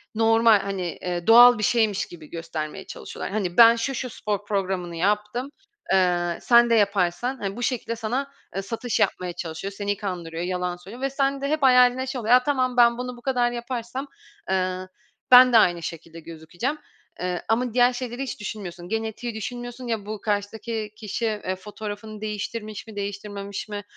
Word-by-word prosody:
normal, 225 -1 +5
hani, 195 -2 -3
eee, 175 -1 -3
doğal 240 +2 +9
bir 210 - -3
şeymiş 220 -3 +2
gibi 160 -3 -13
göstermeye 165 -2 -5
çalışıyorlar. - - -7
Hani, 190 -4 -2
ben 230 0 +9
şu, 250 +4 -2
şu 250 +1 -3
spor 205 -2 -3
programını 190 -4 -2
yaptım, 210 +8 -1 0.4
eee, 175 -2 +2
sen 235 0 +5
de 230 - +4
yaparsan 200 +4 +1
hani, 195 -3 -4
bu 245 - -4
şekilde 240 -2 -1
sana, 245 +5 -3 0.2
ııı, 195 - -2
satış 230 +2 -3
yapmaya 180 -1 0
çalışıyor, 175 +2 -5
seni 205 0 -2
kandırıyor, 175 -4 -4
yalan 180 0 -2
söylüyor 195 +8 -11
ve 275 - 0
sen 275 0 0
de 280 - -1
hep 305 -1 0
hayalinde 250 0 +5
şey 260 -1 -3
oluyor: 225 +2 +3
Ya, 250 0 +6
tamam, 255 -3 0
ben 235 -1 +6
bunu 250 0 -5
bu - - -14
kadar 245 -1 +1
yaparsam, 240 +2 -5 0.4
ııı, 185 0 -1 0.4
ben 250 0 +9
de - - +8
aynı 175 -5 +3
şekilde 165 0 -7
gözükeceğim, 170 - -5 0.4
eee, 180 -1 -2
ama 235 +1 +1
diğer 245 +1 +4
şeyleri 245 +1 -4
hiç 265 - -6
düşünmüyorsun, 185 -4 -7
genetiği 225 +1 -3
düşünmüyorsun. 245 +3 -6
Ya, 225 -4 -2
bu 210 -1 -6
karşıdaki 215 +1 -3
kişi, 215 +2 -3
eee, 210 -4 -2
fotoğrafını 210 +2 -8
değiştirmiş 215 0 -5
mi, 220 - -11
değiştirmemiş 200 0 -5
mi, 205 -1 -5
215 Hz, 175 wpm, -24 LUFS, 190-240 Hz, 0.4 s, doğal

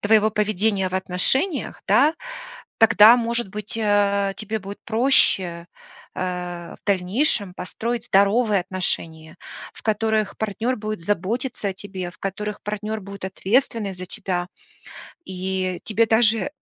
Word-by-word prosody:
твоего 215 +1 +4
поведения 210 -2 +1
в 185 - -7
отношениях, 250 - 0
да, 295 +5 +5 0.6
тогда, 225 +1 +7
может 235 -3 -1
быть, 210 +1 -5
э, 200 -2 +2
тебе 215 0 -3
будет 200 +1 -9
проще, 195 -8 +2 0.5
э, 180 -2 -4
в - - -28
дальнейшем, 200 +1 +1
построить 230 +6 -4
здоровые 200 -1 +3
отношения, 165 -3 -4 0.4
в - - -14
которых 220 -1 0
партнёр 220 +4 -2
будет 215 -3 -4
заботиться 205 +5 -2
о 190 - -4
тебе, 190 -2 -6
в 165 - -23
которых 210 +2 -4
партнёр 210 +1 -4
будет 200 0 -8
ответственный 210 +2 0
за 185 0 -7
тебя, 180 -1 -3 0.8
и 185 -1 -3
тебе 225 +1 +2
даже 225 +4 +2
205 Hz, 125 wpm, -23 LUFS, 185-220 Hz, 0.8 s, тогда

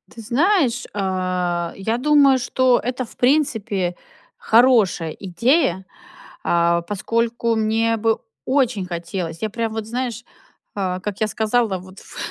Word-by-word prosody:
Ты 230 - -8
знаешь, 270 - +2
а, 185 -3 -1
я 220 +4 -1
думаю, 280 0 +5
что 255 0 +2
это, 250 +1 -2
в - - -17
принципе, 220 - +1 0.4
хорошая 220 -9 +3
идея, 195 - 0 0.6
а, 170 0 +2
поскольку 230 +4 -1
мне 225 +1 +1
бы 225 0 +1 0.3
очень 255 -7 +1
хотелось. 170 -1 -5
Я, 220 - -1
прям 230 0 -3
вот, 220 -1 -4
знаешь, 240 +1 -4 0.5
а, 185 -2 -2
как 200 0 -5
я 215 - +3
сказала, 220 -2 0
вот 185 +1 -13
в - - -14
220 Hz, 130 wpm, -21 LUFS, 185-245 Hz, 0.6 s, думаю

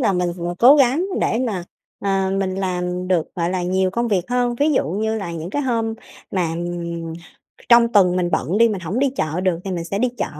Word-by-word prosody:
là 215 -6 +2
mình 180 -1 0
vừa 175 0 -3
cố 265 +5 +8
gắng 280 +6 +3
để 225 - +1
mà, 190 -6 -3 0.4
ờ, 195 -1 +1
mình 190 -1 -1
làm 180 -1 -2
được, 175 -4 0
gọi 170 0 -1
là, 185 -1 -1
nhiều 185 +1 +1
công 235 +4 -1
việc 190 -5 +1
hơn. 245 -1 +1
Ví 295 +5 +2
dụ - - +1
như 220 +3 -1
là 175 -4 -5
những 165 +1 -6
cái 290 +7 -1
hôm 230 -3 -1 0.4
mà, 180 -4 0
ừm, 170 -1 -4 0.6
trong 235 -1 +6
tuần, 185 -3 +4
mình 175 -1 0
bận 170 +10 0
đi, 230 0 +6
mình 200 -4 -3
hổng 185 +8 -3
đi 275 -1 +2
chợ 155 +3 -1
được, 185 -3 0
thì 195 - -4
mình 170 -1 -3
sẽ 200 +4 -3
đi 250 - +2
chợ - - 0
190 Hz, 235 wpm, -21 LUFS, 175-230 Hz, 0.6 s, cố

